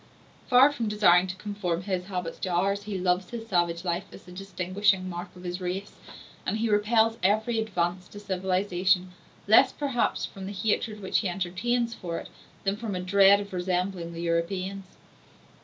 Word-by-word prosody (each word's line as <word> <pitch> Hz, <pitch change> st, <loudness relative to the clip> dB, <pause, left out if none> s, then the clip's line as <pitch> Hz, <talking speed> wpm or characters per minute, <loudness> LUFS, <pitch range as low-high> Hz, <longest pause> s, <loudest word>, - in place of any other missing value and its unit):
Far 260 Hz, +2 st, +6 dB
from 235 Hz, -6 st, -3 dB
desiring 190 Hz, -4 st, +5 dB
to 185 Hz, -, -5 dB
conform 190 Hz, -4 st, -3 dB
his 185 Hz, -2 st, -2 dB
habits 180 Hz, -3 st, -5 dB
to 185 Hz, -, -3 dB
ours, 195 Hz, +3 st, +1 dB
he 205 Hz, -2 st, -3 dB
loves 180 Hz, 0 st, 0 dB
his 230 Hz, -2 st, -6 dB
savage 175 Hz, -3 st, 0 dB
life 175 Hz, +1 st, -1 dB
as -, -, -12 dB
the 180 Hz, -, -14 dB
distinguishing 185 Hz, +1 st, 0 dB
mark 175 Hz, -1 st, -6 dB
of 180 Hz, -, -12 dB
his 180 Hz, +1 st, -4 dB
race, 185 Hz, +3 st, -3 dB, 0.5 s
and 215 Hz, -, -1 dB
he 225 Hz, +1 st, 0 dB
repels 220 Hz, +2 st, +3 dB
every 215 Hz, +4 st, +2 dB
advance 180 Hz, -4 st, -2 dB
to 205 Hz, -, -11 dB
civilization, 185 Hz, -1 st, 0 dB, 0.4 s
less 250 Hz, +5 st, +6 dB
perhaps 275 Hz, -5 st, -1 dB
from 190 Hz, -1 st, -8 dB
the 200 Hz, -, -5 dB
hatred 210 Hz, +1 st, -1 dB
which 190 Hz, -, +1 dB
he 200 Hz, -, -1 dB
entertains 200 Hz, +7 st, -1 dB
for 170 Hz, -5 st, -5 dB
it, -, -, -8 dB, 0.3 s
than 195 Hz, +1 st, 0 dB
from 215 Hz, -3 st, -4 dB
a -, -, -2 dB
dread 195 Hz, +2 st, +5 dB
of 200 Hz, -1 st, -9 dB
resembling 180 Hz, -1 st, -2 dB
the 165 Hz, -, -6 dB
Europeans. 185 Hz, +3 st, -2 dB
190 Hz, 175 wpm, -27 LUFS, 180-210 Hz, 0.5 s, Far